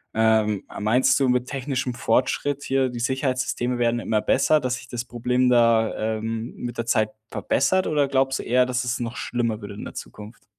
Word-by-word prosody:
Ähm, 110 -2 +2 0.2
meinst 110 +6 +3
du 135 - +2
mit 125 0 +1
technischem 130 -2 -3
Fortschritt 130 +4 0
hier, 135 -1 +1
die 120 -1 -6
Sicherheitssysteme 130 -1 -1
werden 120 0 +1
immer 110 -2 0
besser, 155 +6 +3
dass 130 -3 -1
sich 125 - -10
das 120 0 -5
Problem 125 +1 0
da, 115 -2 +2
ähm, 115 +2 -4
mit 120 -1 -6
der 115 - -1
Zeit 110 -2 +2 0.2
verbessert? 185 +11 +1
Oder 145 -2 +1
glaubst 135 0 +1
du - - -5
eher, 125 +1 +3
dass 125 0 -1
es 125 +1 -1
noch 120 0 -4
schlimmer 115 -3 -2
wird 100 - -7
in - - -8
der - - -8
Zukunft? 105 +2 -10
125 Hz, 195 wpm, -24 LUFS, 115-130 Hz, 0.2 s, meinst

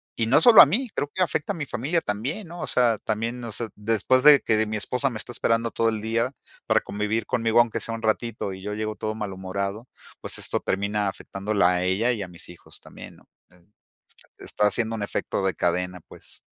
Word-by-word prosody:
Y 115 - -1
no 135 +6 +4
solo 225 +4 +10
a - - +8
mí, 250 +3 -1
creo 145 - -2
que 185 - +1
afecta 165 +1 -2
a - - -8
mi 155 -3 -4
familia 140 +7 -1
también, 135 - -4
¿no? 170 +1 -9
O - - -4
sea, 120 -4 +3
también, 115 +3 -3
o 115 - -6
sea, 115 +2 -4
después 115 +4 +1
de 150 -2 +8
que 110 - +2
de 110 0 +1
mi 110 0 -3
esposa 125 +6 0
me 120 - -6
está 115 +3 -5
esperando 115 -1 0
todo 115 0 +1
el 110 -1 -3
día 115 +3 -1 0.3
para - - +3
convivir 105 +2 -2
conmigo 115 0 +1
aunque 115 -1 +2
sea 115 +1 -3
un 115 - -9
ratito, 110 -2 -1
y 95 - -10
yo 105 +2 -5
llego 110 0 -3
todo 110 0 -4
malhumorado, 100 +2 -5 0.3
pues, - - -2
esto - - 0
termina 100 +1 -1
afectándola 100 0 -1
a 90 0 0
ella 95 +7 +1
y 115 -4 -2
a 95 - -5
mis 90 +2 -9
hijos 90 - -10
también, - - -13
¿no? - - -23 0.2
Em, 90 +2 -26 0.4
está - - -17
está 105 - 0
haciendo 110 +2 0
un 110 - -5
efecto 100 -1 -3
de 95 -3 0
cadena, 90 +2 -1
pues. - - -14
110 Hz, 230 wpm, -24 LUFS, 100-120 Hz, 0.4 s, solo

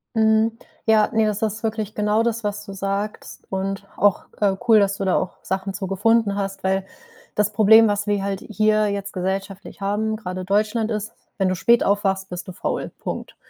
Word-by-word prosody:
Mhm. 220 0 +3 0.3
Ja, 220 -1 +4
ne, 220 -1 +3
das 210 -1 -1
ist 220 0 -2
wirklich 215 -1 -2
genau 210 +2 +2
das, 230 -1 -1
was 210 0 -3
du 195 - -8
sagst. 195 +2 -4
Und 195 +1 -3
auch, 205 -1 +3
äh, 200 -2 +2
cool, 225 -2 +7
dass 200 -1 +1
du 195 - -2
da 185 - +2
auch 185 - -3
Sachen 190 +1 -3
zu 190 -1 -4
gefunden 205 +1 +2
hast, 195 -1 -4
weil 190 0 0 0.5
das 210 0 +1
Problem, 220 +1 +7
was 205 0 -1
wir 205 -1 +1
halt 195 -1 -2
hier 215 -1 +2
jetzt 200 0 -4
gesellschaftlich 195 +2 -4
haben, 210 +2 0
grade 185 -4 -5
Deutschland 215 +3 +1
ist: 215 0 -3 0.2
Wenn 190 -2 +2
du 185 - 0
spät 235 +6 +4
aufwachst, 195 -1 0
bist 180 +2 -6
du - - -6
faul. - - -3
Punkt. - - -6
205 Hz, 195 wpm, -22 LUFS, 195-215 Hz, 0.5 s, cool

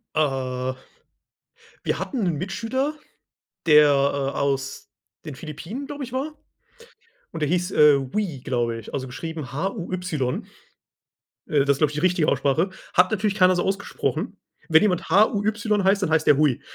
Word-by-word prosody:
Äh. 130 -3 -1 1.1
Wir - - -1
hatten 255 -7 -3
'nen 170 -4 0
Mitschüler, 245 - -2 0.7
der, 150 -2 +7
äh, 140 -1 +1
aus 135 -1 -2 0.3
den 155 -3 -7
Philippinen, 165 - -7
glaube 285 0 -6
ich, 250 - -10
war. 280 +4 -3 1.0
Und - - -6
der 150 - +1
hieß, 180 +2 0
äh, 150 -5 +6
Hui, 140 +3 -3
glaube 120 -2 -1
ich, 110 - -12
also, 130 - -2
geschrieben 155 +1 -6
H-U-Y. 175 -4 -2 1.1
Äh, 145 -2 +2
das 140 - +3
ist, 140 - +1
glaube 150 -1 +2
ich, - - -8
die - - -1
richtige 180 -1 +2
Aussprache. 140 +7 +1 0.2
Hat 180 +2 +4
natürlich 210 -1 0
keiner 185 -2 +5
so 175 - 0
ausgesprochen. 195 +1 -2 0.3
Wenn 160 0 +6
jemand 185 -6 0
H-U-Y 205 +2 +2
heißt, 195 +1 +3
dann 185 - 0
heißt 160 - +2
der 140 - +6
Hui. 145 -5 +2
160 Hz, 160 wpm, -24 LUFS, 140-195 Hz, 1.1 s, der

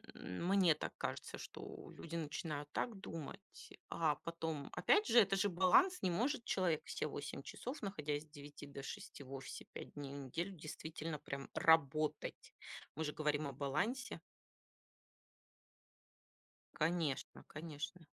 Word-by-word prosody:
Мне 175 - +3
так - - -3
кажется, - - -3
что - - -8
люди 165 0 -4
начинают 150 -1 -2
так 235 - 0
думать, 165 +1 -5 0.5
а 155 -3 +3
потом 160 -2 -3
опять 420 +1 +5
же 240 - +8
это 200 -3 +6
же 200 - +4
баланс. 190 - +6
Не 185 - +3
может 245 - +1
человек 175 -5 +2
все - - -1
8 - - -4
часов, 265 +5 -5
находясь 150 -7 -1
с - - -19
9 145 0 -9
до 140 -1 -7
6 140 - -6
в 130 - -12
офисе 135 -1 -6
5 - - -7
дней 140 -1 -5
в - - -5
неделю 160 +8 -2
действительно 155 -2 -5
прям 140 0 -5
работать. 155 -1 +3 0.4
Мы 160 - -1
же 150 - -1
говорим 150 -1 +1
о 140 - -4
балансе. 210 - 0 2.6
Конечно 160 -3 0
конечно. 155 +2 -5
160 Hz, 140 wpm, -39 LUFS, 145-185 Hz, 2.6 s, же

